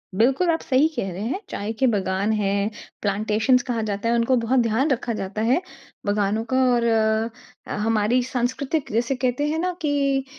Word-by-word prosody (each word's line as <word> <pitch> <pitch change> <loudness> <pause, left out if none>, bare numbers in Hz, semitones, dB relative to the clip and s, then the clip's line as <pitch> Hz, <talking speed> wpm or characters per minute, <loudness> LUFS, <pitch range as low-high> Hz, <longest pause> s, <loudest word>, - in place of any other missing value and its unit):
बिल्कुल 265 - +3
आप 325 - +1
सही 275 +3 +3
कह 195 -6 -2
रहे 185 - -6
हैं। 320 +10 -2
चाय 205 +2 -3
के 260 - +4
बागान 195 -1 0
है 205 -2 0 0.5
प्लांटेशंस 215 +5 +2
कहा 230 -2 0
जाता 205 +3 -1
है 235 - +3
उनको 235 +2 +2
बहुत 255 +3 +2
ध्यान 235 +5 +1
रखा 240 -2 -1
जाता 205 0 -4
है 305 +8 +3 0.4
बागानों 205 +2 0
का 260 - +3 0.2
।और 235 - 0 0.8
अ, - - -4
हमारी 225 +3 +2
सांस्कृतिक 260 +4 -2
जैसे 235 +4 0
कहते 255 +3 0
हैं 320 +1 -1
ना 365 +1 -1
कि 275 -2 +1
235 Hz, 180 wpm, -23 LUFS, 210-265 Hz, 0.8 s, के